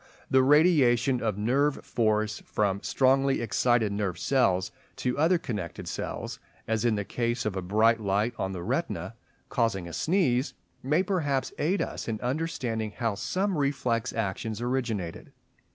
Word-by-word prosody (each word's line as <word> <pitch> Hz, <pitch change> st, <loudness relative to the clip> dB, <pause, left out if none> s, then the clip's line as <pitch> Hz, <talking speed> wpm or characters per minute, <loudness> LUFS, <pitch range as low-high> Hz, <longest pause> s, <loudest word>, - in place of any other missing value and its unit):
The 130 Hz, -, +6 dB
radiation 135 Hz, -4 st, +4 dB
of 110 Hz, -3 st, -1 dB
nerve 135 Hz, +7 st, +1 dB
force 110 Hz, -2 st, 0 dB
from 100 Hz, -2 st, -1 dB
strongly 135 Hz, +1 st, +2 dB
excited 120 Hz, -2 st, +2 dB
nerve 100 Hz, -3 st, -2 dB
cells 95 Hz, -7 st, +1 dB, 0.2 s
to 125 Hz, -1 st, -1 dB
other 170 Hz, +4 st, +4 dB
connected 105 Hz, -, -5 dB
cells, -, -, -5 dB, 0.3 s
as 110 Hz, -1 st, 0 dB
in 120 Hz, -2 st, +2 dB
the 100 Hz, -1 st, -2 dB
case 120 Hz, 0 st, -2 dB
of 105 Hz, -3 st, -1 dB
a 95 Hz, -, -2 dB
bright 110 Hz, +5 st, +3 dB
light 105 Hz, +3 st, 0 dB
on 95 Hz, -, -1 dB
the 90 Hz, -2 st, -5 dB
retina -, -, -2 dB, 0.4 s
causing 100 Hz, -6 st, 0 dB
a 85 Hz, -, -8 dB
sneeze, 155 Hz, -7 st, +1 dB, 0.3 s
may 150 Hz, +7 st, +2 dB
perhaps 150 Hz, -9 st, -1 dB
aid 170 Hz, +3 st, +1 dB
us -, -, -6 dB
in 110 Hz, -2 st, -2 dB
understanding 125 Hz, -6 st, -2 dB
how 115 Hz, -4 st, 0 dB
some 190 Hz, -, -1 dB
reflex 125 Hz, -5 st, 0 dB
actions 110 Hz, 0 st, -3 dB
originated. 120 Hz, -8 st, -3 dB
120 Hz, 150 wpm, -28 LUFS, 105-135 Hz, 0.4 s, The